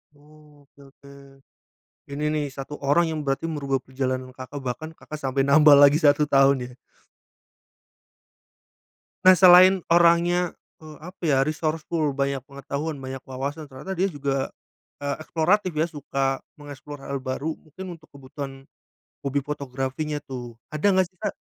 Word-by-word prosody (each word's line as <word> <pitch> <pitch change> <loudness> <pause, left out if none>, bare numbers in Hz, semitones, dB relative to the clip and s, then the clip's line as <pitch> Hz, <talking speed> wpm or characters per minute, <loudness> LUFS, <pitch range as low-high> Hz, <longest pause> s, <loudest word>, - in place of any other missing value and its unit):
Oh, 150 0 -20
oke 140 - -30
oke. 140 0 -17 1.0
Ini 145 +2 -4
nih 150 -1 0
satu 135 +2 -7
orang 145 +5 +3
yang 160 -1 -3
berarti 135 +4 -1
merubah 140 -3 -1
perjalanan 130 0 -3
Kakak, 130 +2 -7
bahkan 130 +5 -5
Kakak 155 -1 -9
sampai 135 -2 -1
nambah 150 +1 +7
lagi 145 +1 +7
1 150 -2 +3
tahun 135 0 +5 0.2
ya? - - -18 2.5
Nah 185 - +10
selain 185 +1 +7
orangnya, 170 +1 +4 0.3
eee, 155 -1 -12
apa 180 +4 -12
ya 140 -4 +3
resourceful, 155 0 -1
banyak 140 0 -1
pengetahuan, 140 +2 -5
banyak 130 0 -6
wawasan, 140 +4 -5
ternyata 150 +7 -7
dia 185 - +2
juga, 140 -2 -2 0.5
eee, 140 -1 -2
eksploratif 185 +5 +1
ya 155 +2 0
suka 135 -3 -2 0.2
mengeksplor 145 0 -10
hal 140 0 -4
baru 135 +4 -4
mungkin 175 +3 -10
untuk 155 - -23
kebutuhan, 135 0 -9 0.6
hobi 140 +1 0
fotografinya 140 +1 -4
tuh. 120 -3 -8 0.2
Ada 155 +6 +2
enggak 185 -1 +3
sih, 185 - -37
Kak - - -2
145 Hz, 145 wpm, -24 LUFS, 135-160 Hz, 2.5 s, Nah